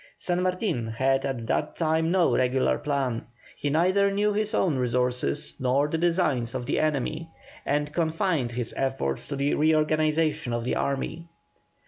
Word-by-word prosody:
San 175 Hz, 0 st, -1 dB
Martin 180 Hz, -, -1 dB
had 135 Hz, +4 st, +1 dB
at 125 Hz, -4 st, -3 dB
that -, -, -1 dB
time 160 Hz, 0 st, +1 dB
no 180 Hz, -1 st, +3 dB
regular 130 Hz, +1 st, +1 dB
plan, 135 Hz, -5 st, -1 dB, 0.3 s
he 145 Hz, -, -2 dB
neither 185 Hz, +6 st, +3 dB
knew 205 Hz, +1 st, +1 dB
his 215 Hz, +1 st, 0 dB
own 160 Hz, -7 st, +1 dB
resources 125 Hz, +3 st, 0 dB
nor 135 Hz, +3 st, +2 dB
the 160 Hz, -, -2 dB
designs 160 Hz, -9 st, +1 dB
of 125 Hz, -1 st, -3 dB
the 140 Hz, -, 0 dB
enemy, 155 Hz, +2 st, -1 dB, 0.4 s
and 145 Hz, +1 st, 0 dB
confined 165 Hz, -5 st, 0 dB
his 120 Hz, -1 st, -3 dB
efforts 130 Hz, -, -2 dB
to 140 Hz, -, -4 dB
the 140 Hz, +1 st, 0 dB
reorganization 155 Hz, -2 st, +1 dB
of 120 Hz, 0 st, -1 dB
the 125 Hz, -, -1 dB
army. 150 Hz, +4 st, -2 dB
150 Hz, 155 wpm, -26 LUFS, 130-165 Hz, 0.4 s, no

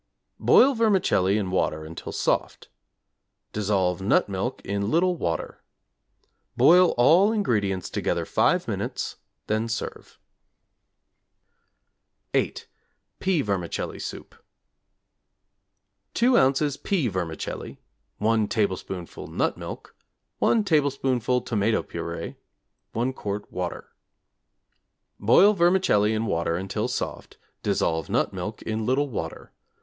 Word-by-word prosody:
Boil 275 Hz, +2 st, +6 dB
vermicelli 190 Hz, -, +2 dB
in 95 Hz, -3 st, -2 dB
water 80 Hz, -4 st, 0 dB
until 80 Hz, +1 st, -7 dB
soft. -, -, -1 dB, 0.8 s
Dissolve 95 Hz, -4 st, 0 dB
nut 95 Hz, -, +3 dB
milk 100 Hz, +6 st, -3 dB
in 100 Hz, +1 st, -1 dB
little 180 Hz, +4 st, +2 dB
water. 85 Hz, -, -3 dB, 1.0 s
Boil 180 Hz, +1 st, +6 dB
all 170 Hz, -, +5 dB
ingredients 105 Hz, -, 0 dB
together -, -, -1 dB
5 -, -, +2 dB
minutes, -, -, -3 dB, 0.3 s
then 110 Hz, +2 st, 0 dB
serve. 110 Hz, -, -5 dB, 2.2 s
=8. -, -, 0 dB, 0.5 s
Pea 185 Hz, -6 st, +1 dB
Vermicelli 95 Hz, -5 st, -3 dB
Soup= -, -, -7 dB, 1.8 s
2 240 Hz, +2 st, +3 dB
ozs. 140 Hz, -, +2 dB
pea 175 Hz, -10 st, 0 dB
vermicelli, 90 Hz, -6 st, -4 dB, 0.4 s
1 110 Hz, 0 st, +2 dB
tablespoonful 95 Hz, -5 st, -3 dB
nut -, -, -1 dB
milk, -, -, -9 dB, 0.4 s
1 225 Hz, -2 st, +3 dB
tablespoonful 135 Hz, -, +1 dB
tomato 110 Hz, -1 st, 0 dB
purée, 85 Hz, 0 st, -6 dB, 0.6 s
1 125 Hz, +3 st, -1 dB
quart 105 Hz, -4 st, -5 dB
water. 90 Hz, -1 st, -5 dB, 1.3 s
Boil 180 Hz, -, +6 dB
vermicelli 170 Hz, -, +3 dB
in 110 Hz, +1 st, -1 dB
water 85 Hz, -4 st, 0 dB
until 95 Hz, +2 st, -2 dB
soft, -, -, -5 dB, 0.2 s
dissolve 80 Hz, 0 st, 0 dB
nut -, -, +1 dB
milk -, -, -5 dB
in 110 Hz, 0 st, -2 dB
little 130 Hz, +5 st, +1 dB
water. 80 Hz, -10 st, -6 dB
110 Hz, 105 wpm, -25 LUFS, 95-150 Hz, 2.2 s, Boil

